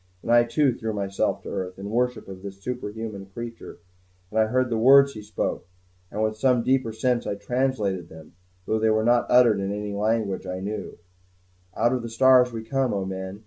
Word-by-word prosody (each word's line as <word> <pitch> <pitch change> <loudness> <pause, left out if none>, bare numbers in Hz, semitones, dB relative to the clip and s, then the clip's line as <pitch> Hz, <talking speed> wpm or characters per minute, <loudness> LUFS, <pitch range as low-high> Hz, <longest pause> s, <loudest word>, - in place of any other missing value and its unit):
And 115 - -2
I 120 0 +6
too 135 +2 +2
threw 110 -2 -4
myself 100 -1 -1
to - - -7
earth, 90 0 -4
in 100 +2 -7
worship 125 +2 -1
of 95 -1 -9
this 100 0 -9
superhuman 110 -3 -6
creature; 115 +3 -8 0.5
and 110 - 0
I 110 - +4
heard 125 +2 0
the 115 - +1
words 140 +3 +6
he 110 - -8
spoke, 105 -2 -4 0.4
and 110 - -2
with 110 0 -1
some 125 -1 +3
deeper 130 -3 +1
sense 120 +2 0
I - - -2
translated 100 -5 -1
them, 80 -1 -13 0.3
though 110 - 0
they 110 0 +2
were 110 0 +2
not 120 0 +3
uttered 120 -5 +5
in 100 0 -2
any 105 0 -4
language 105 -2 -1
I 90 0 -4
knew: 105 +3 -5 0.8
"Out 120 +2 +2
of 125 - -1
the 115 - -6
stars 125 +1 +5
we 115 -1 -6
come, 130 0 0
O 95 -1 -2
men! 95 +1 -6
110 Hz, 205 wpm, -25 LUFS, 100-125 Hz, 0.8 s, I